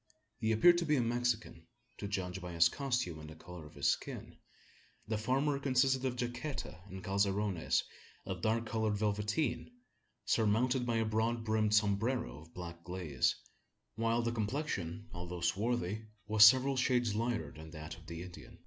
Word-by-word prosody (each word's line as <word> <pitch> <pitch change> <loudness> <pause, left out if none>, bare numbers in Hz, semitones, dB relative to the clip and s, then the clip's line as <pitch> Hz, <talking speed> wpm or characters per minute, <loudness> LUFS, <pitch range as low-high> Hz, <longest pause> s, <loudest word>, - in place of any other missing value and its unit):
He 110 -1 +1
appeared 175 +11 +6
to 170 - -1
be 150 - +4
a 130 - +3
Mexican, 115 -7 -1 0.3
to 100 - -3
judge 95 -2 -3
by 90 0 -6
his 85 0 +5
costume 120 - -2
and 75 0 -9
the 80 - -10
colour 85 -1 -10
of - - -17
his - - -4
skin. - - -2 0.7
The 110 -1 -1
former 135 +5 +1
consisted 130 -1 +2
of 130 -2 0
jaqueta 120 - -4
and 95 -1 -8
calzoneros 100 -2 +1 0.4
of 95 -2 -4
dark 115 +3 +1
coloured 110 -2 0
velveteen, 105 +7 0 0.6
surmounted 120 +4 +2
by 120 - +1
a 115 0 +2
broad 110 +2 0
brimmed 110 -1 +2
sombrero 110 - +1
of 80 +1 -17
black 85 -1 -7
glaze; 85 -6 0 0.6
while 115 +1 +1
the 115 - 0
complexion, 110 - -3
although 90 0 -5
swarthy, 110 +3 -1 0.2
was 105 0 +6
several 130 +4 +7
shades 125 -4 +2
lighter 115 -8 -1
than 80 +1 -11
that 80 0 -7
of 80 -1 -16
the 85 +1 -6
Indian. 90 -1 -11
110 Hz, 165 wpm, -34 LUFS, 90-120 Hz, 0.7 s, several